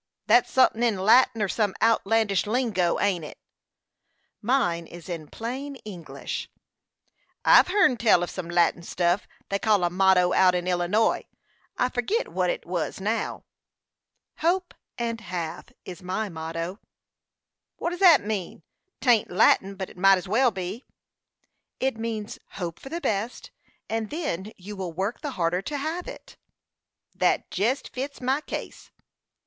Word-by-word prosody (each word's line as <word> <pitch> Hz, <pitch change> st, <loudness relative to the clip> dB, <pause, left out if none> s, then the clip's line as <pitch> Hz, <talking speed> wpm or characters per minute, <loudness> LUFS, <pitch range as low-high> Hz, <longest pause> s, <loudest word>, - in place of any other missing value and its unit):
"That's 230 Hz, +4 st, +4 dB
sunthin' 255 Hz, -3 st, +4 dB
in 230 Hz, -4 st, +2 dB
Latin, 225 Hz, +3 st, +4 dB
or -, -, +1 dB
some 205 Hz, 0 st, 0 dB
outlandish 220 Hz, -2 st, +2 dB
lingo 210 Hz, -7 st, +1 dB
ain't 190 Hz, -5 st, +1 dB
it?" 150 Hz, -, -9 dB, 1.0 s
"Mine 175 Hz, -9 st, +1 dB
is 170 Hz, -1 st, -11 dB
in 165 Hz, -4 st, -5 dB
plain 260 Hz, -, -5 dB
English." 180 Hz, -6 st, -6 dB, 1.0 s
"I've -, -, +7 dB
hearn 360 Hz, -9 st, +3 dB
tell 210 Hz, -6 st, +4 dB
of 175 Hz, -, -4 dB
some 180 Hz, -3 st, -6 dB
Latin 175 Hz, 0 st, +2 dB
stuff 175 Hz, +2 st, 0 dB, 0.2 s
they 200 Hz, -, 0 dB
called 210 Hz, -3 st, +2 dB
a 175 Hz, -, +1 dB
motto 185 Hz, -1 st, +4 dB
out 185 Hz, -1 st, +5 dB
in 175 Hz, 0 st, -1 dB
Illinois; 180 Hz, +5 st, +1 dB, 0.5 s
I 250 Hz, -, +2 dB
forgit 390 Hz, -, -1 dB
what -, -, 0 dB
it -, -, -3 dB
was -, -, -3 dB
now." -, -, -2 dB, 0.9 s
"'Hope 355 Hz, +2 st, 0 dB, 0.2 s
and 230 Hz, -1 st, -3 dB
have,' 175 Hz, +1 st, -5 dB
is 185 Hz, +1 st, -8 dB
my 190 Hz, +4 st, -3 dB
motto." 165 Hz, +3 st, -5 dB, 1.0 s
"What 340 Hz, -, -3 dB
does 350 Hz, -, -5 dB
that 345 Hz, -, +7 dB
mean? 195 Hz, -6 st, -4 dB, 0.4 s
'Tain't 240 Hz, -5 st, +3 dB
Latin, 195 Hz, +2 st, +3 dB
but 190 Hz, -1 st, -6 dB
it -, -, -17 dB
might 195 Hz, +1 st, +6 dB
as 185 Hz, -, -6 dB
well 245 Hz, +6 st, +3 dB
be." 190 Hz, +4 st, -5 dB, 1.0 s
"It 265 Hz, -2 st, 0 dB
means 225 Hz, -2 st, -4 dB
hope 175 Hz, -4 st, -5 dB
for 270 Hz, -, -10 dB
the 335 Hz, +3 st, -4 dB
best, 215 Hz, 0 st, -2 dB, 0.4 s
and 225 Hz, -1 st, -2 dB
then 220 Hz, -, -3 dB
you 205 Hz, +3 st, -9 dB
will 185 Hz, -3 st, -5 dB
work 195 Hz, +7 st, -3 dB
the 295 Hz, -, -3 dB
harder 175 Hz, -1 st, 0 dB
to 290 Hz, +8 st, -4 dB
have 320 Hz, +5 st, -3 dB
it." -, -, -10 dB, 0.8 s
"Thet -, -, +1 dB
jest 250 Hz, +6 st, 0 dB
fits 275 Hz, +3 st, -5 dB
my 265 Hz, +3 st, 0 dB
case." -, -, -6 dB
205 Hz, 150 wpm, -26 LUFS, 180-245 Hz, 1.0 s, I've